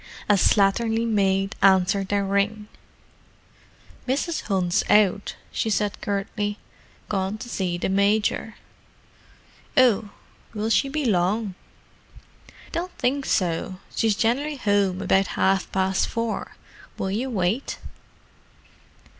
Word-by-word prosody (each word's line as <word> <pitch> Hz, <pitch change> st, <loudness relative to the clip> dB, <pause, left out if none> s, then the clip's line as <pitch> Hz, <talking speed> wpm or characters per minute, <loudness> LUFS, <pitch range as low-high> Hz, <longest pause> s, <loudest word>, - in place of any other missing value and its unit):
A 210 Hz, -, +5 dB
slatternly 220 Hz, +4 st, +3 dB
maid 195 Hz, -2 st, +1 dB
answered 195 Hz, 0 st, +4 dB
their 200 Hz, 0 st, 0 dB
ring. 200 Hz, +2 st, 0 dB, 1.4 s
"Mrs. 290 Hz, +6 st, -1 dB
Hunt's 190 Hz, -1 st, +1 dB
out," 205 Hz, -1 st, +3 dB, 0.2 s
she 225 Hz, -, -1 dB
said 205 Hz, 0 st, -1 dB
curtly. 205 Hz, +1 st, -2 dB, 0.5 s
"Gorn 195 Hz, +1 st, -2 dB
to 240 Hz, -, -8 dB
see 185 Hz, -6 st, -2 dB
the -, -, -2 dB
Mijor." 205 Hz, +3 st, +1 dB, 1.2 s
"Oh—will 220 Hz, -2 st, 0 dB
she 275 Hz, -, +3 dB
be 300 Hz, +1 st, -2 dB
long?" 200 Hz, 0 st, +1 dB, 1.2 s
"Don't 355 Hz, +2 st, -3 dB
think 270 Hz, +2 st, 0 dB
so—she's 185 Hz, +4 st, -1 dB
gen'lly 270 Hz, +8 st, 0 dB
home 200 Hz, -6 st, +1 dB
about 195 Hz, 0 st, +3 dB
half 190 Hz, 0 st, +1 dB
past 190 Hz, 0 st, +1 dB
four. 230 Hz, -1 st, -3 dB, 0.4 s
Will 190 Hz, -, -2 dB
yer 240 Hz, +7 st, -2 dB
wait?" 210 Hz, +3 st, -1 dB
205 Hz, 105 wpm, -24 LUFS, 195-225 Hz, 1.4 s, A